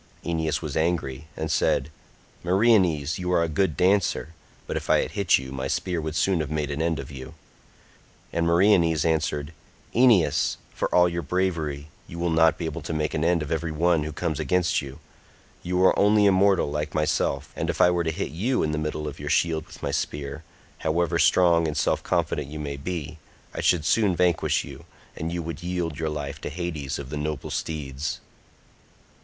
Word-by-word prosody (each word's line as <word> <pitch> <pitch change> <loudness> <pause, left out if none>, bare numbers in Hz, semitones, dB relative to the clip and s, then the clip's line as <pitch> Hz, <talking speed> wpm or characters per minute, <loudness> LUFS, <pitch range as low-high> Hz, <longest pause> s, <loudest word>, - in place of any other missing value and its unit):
Aeneas 80 -1 -1
was 75 -3 -4
angry 80 -3 -1
and 80 0 -2
said, 75 -1 +1 0.5
"Meriones, 95 -4 +3
you 90 0 -2
are 85 -2 +3
a - - 0
good 80 +1 0
dancer, 90 -3 +1 0.3
but - - -4
if - - -4
I - - +5
had - - -6
hit 100 -3 +3
you 65 0 -7
my 65 -1 -3
spear 90 -3 -1
would 80 0 -4
soon 90 +2 +2
have 75 -2 -2
made 75 -1 -2
an 70 +2 -2
end 80 -1 0
of 70 +1 -7
you." 65 -2 -9 1.0
And 85 0 +1
Meriones 85 -3 +4
answered, 80 -1 0 0.4
"Aeneas, 90 - +4 0.2
for - - -1
all 90 0 +4
your 85 0 -2
bravery, 80 -3 -2 0.2
you 85 - -9
will 85 0 0
not 80 0 +4
be 85 - -4
able 80 +1 -4
to 75 - -5
make 75 0 -1
an 75 - -1
end 85 -1 +2
of 75 - -7
every 80 0 -1
one 85 +1 +2
who 75 +1 -4
comes 80 -1 -3
against 90 -2 +1
you. 70 -1 -9 0.6
You 90 +1 -1
are - - +4
only 105 +1 +5
a 100 - +6
mortal 95 -5 +3
like 75 0 -3
myself, 75 -2 0
and - - -2
if - - -2
I 90 - +6
were 85 -1 0
to 80 - -1
hit - - -4
you 110 - 0
in 75 - 0
the 75 - -1
middle 75 0 -3
of 75 0 -7
your 75 0 -5
shield 80 0 +1
with - - -14
my - - -1
spear, 75 +2 -3 0.4
however 85 +1 0
strong 85 -2 +4
and 75 -1 -3
self - - +1
confident - - -1
you 75 +2 -7
may 75 -2 -4
be, 80 +1 -5 0.3
I - - -4
should 85 -4 +2
soon 100 -3 +3
vanquish 90 -1 +2
you, - - -11 0.3
and 80 +1 -4
you 85 -1 -3
would 80 0 -6
yield 85 -3 -3
your 80 -1 -1
life 75 -2 -5
to - - -4
Hades 80 -4 -4
of 70 -2 -8
the 75 - -3
noble 75 -1 -4
steeds." 75 -2 -4
80 Hz, 205 wpm, -25 LUFS, 75-90 Hz, 1.0 s, a